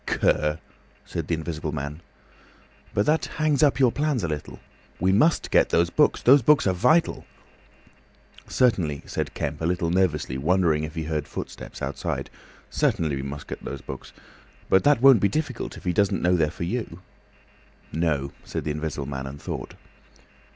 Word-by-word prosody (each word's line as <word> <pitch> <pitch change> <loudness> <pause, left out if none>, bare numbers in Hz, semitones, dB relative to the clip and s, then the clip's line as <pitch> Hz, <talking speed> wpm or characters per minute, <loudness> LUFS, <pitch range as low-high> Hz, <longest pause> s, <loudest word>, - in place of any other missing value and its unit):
"Cur!" 75 0 +1 0.5
said 85 -3 -5
the 85 - +1
Invisible 80 -1 -4
Man. 75 +2 -5 0.9
"But 100 - +1
that 155 +2 +2
hangs 155 -3 +2
up 145 -2 +4
your 130 -3 +5
plans 145 -6 0
a - - 0
little." 75 -2 -5 0.4
"We 95 - +2
must 150 - +2
get - - +4
those 85 +1 +2
books; 150 +7 +2
those 135 +3 +7
books 145 +4 +4
are 95 - +2
vital." 125 - +2 1.2
"Certainly," 90 - +1
said - - -4
Kemp, - - -3
a - - -1
little 85 -1 0
nervously, 75 -8 0
wondering 80 0 +2
if 75 - -9
he 80 - -2
heard 75 -1 -3
footsteps - - -7
outside. - - -3 0.4
"Certainly 80 -4 +1
we 65 - -3
must 70 +1 -6
get - - -8
those 70 - -6
books. 65 - -9 0.6
But 95 - +4
that 145 -4 +4
won't 135 -4 +8
be 100 - +2
difficult, 145 0 -3
if - - -12
he 90 - 0
doesn't 100 +3 +1
know 90 +1 +4
they're 80 -3 +2
for 85 - -6
you." 90 -2 -4 0.9
"No," 75 -4 0
said - - -4
the 75 - -2
Invisible 75 -2 -3
Man, 65 -1 -5
and 70 +2 -8
thought. - - -6
85 Hz, 170 wpm, -25 LUFS, 75-120 Hz, 1.2 s, won't